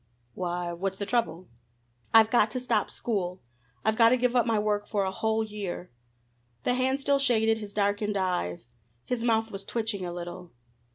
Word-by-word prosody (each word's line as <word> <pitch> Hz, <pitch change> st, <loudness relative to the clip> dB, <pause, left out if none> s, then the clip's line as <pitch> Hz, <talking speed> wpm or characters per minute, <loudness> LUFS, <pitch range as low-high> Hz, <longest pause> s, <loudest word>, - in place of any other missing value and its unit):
"Why, 175 Hz, -1 st, -3 dB
what's 190 Hz, +2 st, -3 dB
the 200 Hz, -, -3 dB
trouble?" 200 Hz, -7 st, -1 dB, 0.6 s
"I've 220 Hz, -1 st, +6 dB
got 225 Hz, -3 st, +4 dB
to 255 Hz, +4 st, -3 dB
stop 250 Hz, -, 0 dB
school! 185 Hz, -5 st, -3 dB, 0.5 s
I've 220 Hz, 0 st, +3 dB
got 230 Hz, -1 st, +7 dB
to 255 Hz, -, +4 dB
give 250 Hz, 0 st, +1 dB
up 240 Hz, -1 st, +3 dB
my 225 Hz, -1 st, +2 dB
work 210 Hz, 0 st, 0 dB
for 205 Hz, -3 st, 0 dB
a 190 Hz, -, -1 dB
whole 220 Hz, +3 st, 0 dB
year!" 205 Hz, -4 st, -6 dB, 0.7 s
The -, -, +2 dB
hand 260 Hz, +2 st, +1 dB
still 280 Hz, 0 st, +2 dB
shaded 225 Hz, -4 st, +3 dB
his 210 Hz, -2 st, -7 dB
darkened 205 Hz, 0 st, 0 dB
eyes. 180 Hz, -, -1 dB, 0.4 s
His 250 Hz, -2 st, -2 dB
mouth 225 Hz, -1 st, +1 dB
was 195 Hz, 0 st, -6 dB
twitching 220 Hz, -3 st, -2 dB
a 175 Hz, -, -3 dB
little. 175 Hz, 0 st, -7 dB
210 Hz, 180 wpm, -28 LUFS, 190-230 Hz, 0.7 s, got